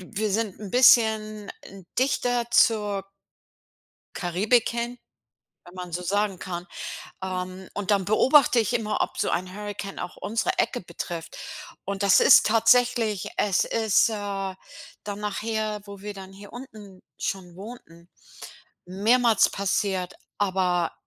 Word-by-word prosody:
wir 205 +3 -3
sind 215 -2 -1
'n 205 -2 -7
bisschen 220 -3 +4 0.5
dichter 245 -2 +1
zur 210 -4 +3 1.1
Karibik 200 +7 +1
hin, 235 +1 -3 0.7
wenn 175 - -15
man 180 -1 -7
so 180 - -2
sagen 200 +2 0
kann. 180 0 -6 0.6
Ähm, 185 0 -5
und 205 0 -2
dann 200 -2 +2
beobachte 255 +5 +5
ich 225 +1 0
immer, 220 -3 0
ob - - -2
so - - 0
ein 185 +1 -2
Hurrikan 205 -1 -6
auch 180 - -6
unsere 225 +2 -1
Ecke - - 0
betrifft. 170 -1 -7 0.5
Und 200 +1 -3
das 200 -1 +6
ist - - +7
tatsächlich 225 -2 +3
es 200 -3 +2
ist, 220 -1 +3
äh, - - -3 0.9
dann 205 -1 -5
nachher, 210 +1 -2
wo 200 -1 -10
wir 210 +1 -6
dann 190 -1 -10
hier 200 +1 -13
unten 215 -6 -11 0.2
schon 180 -3 -4
wohnten, 180 -5 -12 0.8
mehrmals 220 +4 +3
passiert, 195 -1 -1 0.2
aber 185 -4 +1
205 Hz, 130 wpm, -25 LUFS, 185-225 Hz, 1.1 s, ist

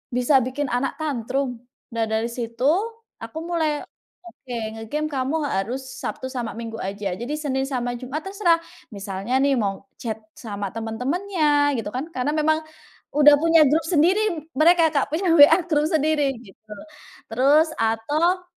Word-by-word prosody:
bisa 250 +3 +3
bikin 270 +3 -2
anak 245 +3 -1
tantrum. 265 -3 -2 0.4
Nah, 230 -1 0
dari 220 +1 0
situ 235 0 -5 0.6
aku 225 +7 -8
mulai, 320 -3 -1 0.4
"Oke, 260 -7 -11 0.3
nge-game 300 +8 -3
kamu 270 +2 -1
harus 230 +8 -2 0.2
Sabtu 260 - -4
sama 240 -4 -4
Minggu 230 -1 -6
aja." 195 0 -3
Jadi, 240 +6 -4
Senin 270 -3 -1
sama 245 -3 -2
Jumat 265 +4 -5
terserah, 385 -4 +2 0.4
misalnya 195 +3 -5
nih, 280 0 +3
mau 200 -2 -3
chat 220 -2 -4 0.2
sama 205 -3 -5
temen-temennya 290 - 0
gitu 215 -2 -3
kan, 265 - -2
karena 260 +3 0
memang 310 0 +2 0.6
udah 295 0 +8
punya 330 0 +5
grup 315 +3 +2
sendiri 350 +5 +3 0.4
mereka, 335 +2 +5
Kak, 280 -2 +2
punya 355 +4 -1
WA 310 +3 +8
grup 300 -2 +2
sendiri, 305 -3 +2
gitu. 215 +2 -18 0.6
Terus 280 +7 +4
atau, 300 +12 +1
275 Hz, 145 wpm, -23 LUFS, 230-310 Hz, 0.6 s, udah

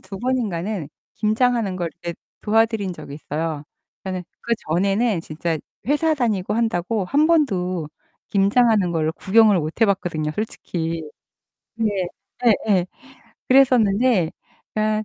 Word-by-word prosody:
2 195 +1 -9
번인가는 210 - -2 0.3
김장하는 220 -2 +1
걸 175 -2 -2
이렇게 170 -1 -4 0.3
도와드린 220 -3 +2
적이 140 -4 -9
있어요. 150 0 -4 0.4
그러니까는 185 -1 -4 0.2
그전에는 200 0 0
진짜 160 +1 -2 0.3
회사 310 +4 +2
다니고 215 -8 0
한다고 220 -2 0
1 290 +6 +3
번도 185 - +1 0.4
김장하는 205 -1 +3
거를 160 -1 0
구경을 210 +2 +4
못 155 +5 -4
해봤거든요, 180 -8 +1
솔직히. 165 -4 -3 0.7
네. 225 -1 +1 0.8
예예. 185 -4 +3 0.6
그랬었는데 240 - +4 0.4
그러니까 215 0 0
200 Hz, 285 characters per minute, -22 LUFS, 175-230 Hz, 0.8 s, 구경을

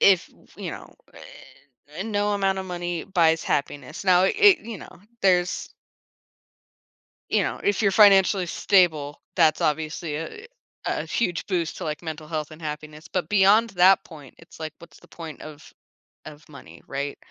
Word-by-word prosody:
if, 190 -3 +4 0.3
you - - -5
know, - - -10 0.2
er, 145 +5 -12
no 205 -1 0
amount 195 -1 0
of 190 - -5
money 175 -2 -4
buys 165 -4 +2
happiness. 145 +5 -3
Now 180 -1 +5
i - - +4
it 410 -2 +5
you 220 -4 -8
know, - - -13 0.2
there's 180 -2 +1 1.6
you - - +2
know, - - -3
if 205 +1 +1
you're 200 - +3
financially 195 -2 +5
stable, 165 -6 +1
that's 160 -4 +3
obviously 155 0 -2
a 285 - -8 0.4
a - - -2
huge 175 -8 -2
boost 175 -5 -1
to, - - -7
like, 150 -2 -4
mental 160 -2 -7
health 155 -2 -3
and 155 +1 -13
happiness. 155 +1 -7
But 180 -4 -2
beyond 210 +3 +4
that 185 +1 +5
point, 145 -6 -13
it's 165 - -17
like, 155 -1 -5
what's 170 - -16
the - - -19
point 160 -3 -9
of 155 -1 -12 0.5
of 150 0 -12
money? 85 - -14
Right? 140 +1 -4
170 Hz, 165 wpm, -24 LUFS, 155-195 Hz, 1.6 s, Now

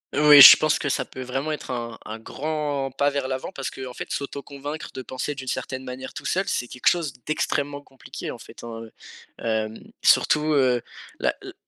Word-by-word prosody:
Oui, 145 -1 +9
je - - +13
pense 155 0 +2
que 145 - -3
ça - - -1
peut 130 - -8
vraiment 135 +5 -3
être 150 -3 -5
un 115 -2 -5
un 110 +1 -7
grand 145 +1 -3
pas 140 +2 +1
vers 140 -2 -2
l'avant 130 0 -4
parce 135 - -5
qu'en 130 -1 -8
fait - - -7
s'auto-convaincre 140 +2 -6
de 130 - -6
penser 130 +3 -4
d'une 135 -2 -9
certaine 130 +1 -4
manière 130 0 -7
tout - - -8
seul, 190 - +1
c'est 125 - -1
quelque 125 - -11
chose 165 -6 +2
d'extrêmement 145 -2 -2
compliqué, 135 -2 -9
en - - -6
fait, - - -13
hein, 115 -1 -7 0.6
hem. 110 -1 -2 0.3
Surtout, 150 0 +4
heu, 125 -4 +2 0.4
la, - - +1
le - - -9
135 Hz, 195 wpm, -24 LUFS, 125-145 Hz, 0.6 s, je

